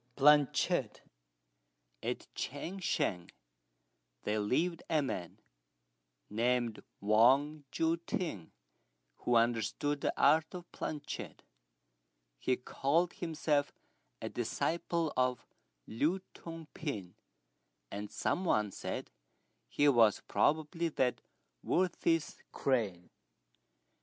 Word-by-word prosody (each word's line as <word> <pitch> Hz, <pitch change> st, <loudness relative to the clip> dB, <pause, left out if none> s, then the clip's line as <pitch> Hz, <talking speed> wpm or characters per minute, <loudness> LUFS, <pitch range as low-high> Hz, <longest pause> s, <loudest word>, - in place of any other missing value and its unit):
PLANCHETTE. 145 Hz, 0 st, +4 dB, 1.0 s
At -, -, -3 dB
Ch'ang 170 Hz, +8 st, -4 dB
shan 90 Hz, -, 0 dB, 0.9 s
there 105 Hz, +1 st, 0 dB
lived 160 Hz, +11 st, +1 dB
a 155 Hz, -3 st, +3 dB
man, 90 Hz, -10 st, -4 dB, 0.9 s
named 120 Hz, +1 st, 0 dB, 0.2 s
Wang 135 Hz, +8 st, +4 dB
Jui 165 Hz, +1 st, +1 dB
t'ing, 130 Hz, -, -3 dB, 0.7 s
who 120 Hz, -, +1 dB
understood 120 Hz, +5 st, +1 dB
the -, -, +1 dB
art 155 Hz, +4 st, +4 dB
of 175 Hz, -1 st, -9 dB
planchette. 150 Hz, -2 st, -5 dB, 1.0 s
He 130 Hz, -, +1 dB
called 160 Hz, +7 st, +1 dB
himself 155 Hz, -3 st, 0 dB, 0.5 s
a -, -, -4 dB
disciple 170 Hz, -1 st, -1 dB
of 125 Hz, -1 st, +1 dB, 0.4 s
Lü 155 Hz, -, 0 dB
Tung 165 Hz, -1 st, -8 dB
pin, 105 Hz, -, -4 dB, 0.8 s
and 105 Hz, +1 st, -5 dB
some 185 Hz, -, -1 dB
one 105 Hz, -, +2 dB
said -, -, -5 dB, 0.6 s
he 145 Hz, -, +3 dB
was 115 Hz, -6 st, +5 dB
probably 160 Hz, +3 st, +1 dB
that 125 Hz, -5 st, 0 dB, 0.4 s
worthy's 170 Hz, -3 st, +1 dB
crane. 105 Hz, -10 st, -1 dB
145 Hz, 90 wpm, -33 LUFS, 115-160 Hz, 1.0 s, was